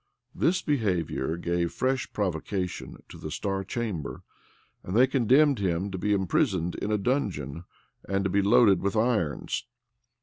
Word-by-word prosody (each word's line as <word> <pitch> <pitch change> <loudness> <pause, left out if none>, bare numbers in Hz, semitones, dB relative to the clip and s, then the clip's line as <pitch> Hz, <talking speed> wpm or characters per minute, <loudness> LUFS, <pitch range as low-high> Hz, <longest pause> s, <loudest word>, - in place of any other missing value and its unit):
This 185 +2 +1
behavior 90 - 0
gave 85 0 -1
fresh 130 0 -1
provocation 90 -1 -3
to - - -12
the 80 - -6
star 95 +4 -2
chamber; 95 - -4 0.6
and 90 - -5
they 125 - +7
condemned 135 +1 +3
him 95 0 -1
to 95 - -4
be 105 - 0
imprisoned 95 - +1
in 105 - -3
a 105 - +2
dungeon, 90 - -2 0.4
and 100 0 +1
to 95 - 0
be 100 - +3
loaded 105 -1 +5
with 100 +1 -1
irons. 110 -10 0
100 Hz, 145 wpm, -27 LUFS, 90-120 Hz, 0.6 s, they